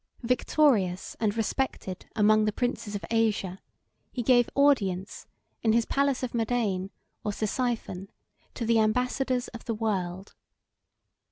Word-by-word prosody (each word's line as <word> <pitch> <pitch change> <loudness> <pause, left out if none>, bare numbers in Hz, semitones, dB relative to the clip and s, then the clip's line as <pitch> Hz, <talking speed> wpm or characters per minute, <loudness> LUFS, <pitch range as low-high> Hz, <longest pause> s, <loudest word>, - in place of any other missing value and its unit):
Victorious 235 -6 +2
and 215 -1 0
respected 225 -5 -2
among 215 0 +4
the 215 - +2
princes 220 -2 -2
of 200 - -4
Asia, 210 -5 +1 0.5
he 245 - -3
gave 245 0 +4
audience, 200 -10 +2 0.3
in 220 -1 +3
his 230 0 +3
palace 280 -2 +1
of 250 - -3
Madain, 220 -5 0 0.3
or 210 - -1
Ctesiphon, 215 -3 -2 0.5
to 235 - -3
the 230 0 +3
ambassadors 250 +3 +1
of 230 - -10
the 230 - -2
world. 195 -4 -2
225 Hz, 125 wpm, -28 LUFS, 200-245 Hz, 0.5 s, among